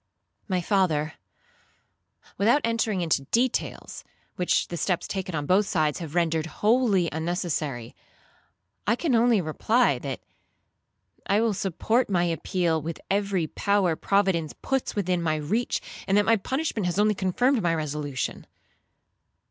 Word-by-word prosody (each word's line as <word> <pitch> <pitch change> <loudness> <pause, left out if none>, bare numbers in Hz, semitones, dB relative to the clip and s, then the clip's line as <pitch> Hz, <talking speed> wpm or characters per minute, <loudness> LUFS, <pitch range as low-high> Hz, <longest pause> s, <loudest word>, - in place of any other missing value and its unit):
'—'My 185 -1 +1
father, 170 -5 +1 1.2
without 235 +9 +3
entering 230 -4 0
into 160 -5 0
details, 245 +2 -1 0.3
which 180 - +1
the 175 - -4
steps 175 0 -1
taken 190 -3 -4
on 145 -2 -2
both 195 +5 +3
sides 155 -3 0
have 165 -2 -7
rendered 165 -2 +1
wholly 210 -1 +2
unnecessary, 160 - -3 0.9
I 220 - +4
can 290 +1 -1
only 230 -3 +4
reply, 220 +10 +2
that - - -5 1.1
I 200 - +3
will 225 -1 +2
support 200 +6 0
my 180 -3 +2
appeal 170 -1 0
with 165 +2 -5
every 195 -3 +1
power 195 0 +1
Providence 190 -5 +1
puts 270 -1 -1
within 185 -3 0
my 160 -2 +1
reach, 195 +11 -1 0.3
and 195 +1 +3
that 205 - +4
my 225 - +5
punishment 245 - -2
has 175 - -2
only 210 +1 +4
confirmed 220 +7 +1
my 170 -2 +1
resolution.' 150 -4 -3
185 Hz, 135 wpm, -26 LUFS, 165-215 Hz, 1.2 s, my